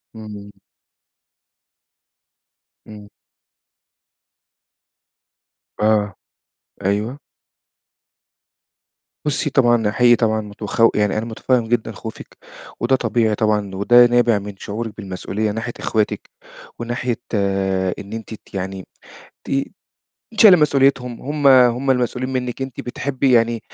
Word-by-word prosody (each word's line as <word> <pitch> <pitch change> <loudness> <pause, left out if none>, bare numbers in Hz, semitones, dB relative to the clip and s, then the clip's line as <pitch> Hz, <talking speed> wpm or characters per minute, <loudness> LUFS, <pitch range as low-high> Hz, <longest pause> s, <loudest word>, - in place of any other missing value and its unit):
إمم. 105 -2 -10 2.4
إمم. 105 -1 -12 2.7
آه، 105 -2 +2 0.7
أيوه. 105 +7 -1 2.1
بُصّي 150 0 -1
طبعًا، 120 -5 +2
حقيقي 120 +2 +5
طبعًا 110 -2 0
متخو 105 +2 +1
يعني 105 0 +1
أنا 110 - -2
مُتفهِّم 115 +1 -1
جدًا 115 -1 -1
خوفِك، 110 +1 -10 0.4
وده 120 +4 +2
طبيعي 115 -3 0
طبعًا، 105 -3 0
وده 120 +5 +6
نابع 120 -3 +3
من 100 0 -8
شعورِك 110 +2 -5
بالمسئولية 100 +1 -3
ناحية 115 +2 -4
إخواتِك 110 -2 -2 0.5
وناحية 120 0 -3 0.2
آآ 95 -2 0
إن 100 +1 -9
أنتِ 115 0 -7
ت - - -14
يعني 95 0 -5 0.6
ت - - -5 0.9
شايلة 205 -4 +9
مسئوليتهم، 135 -5 +2
هُم 145 +1 -2
هُم 130 0 +5
المسئولين 125 +1 0
منِك، 125 0 -3
أنتِ 130 -2 -6
بتحبّي 130 +1 -1
يعني 115 -1 +3
115 Hz, 100 wpm, -20 LUFS, 105-125 Hz, 2.7 s, شايلة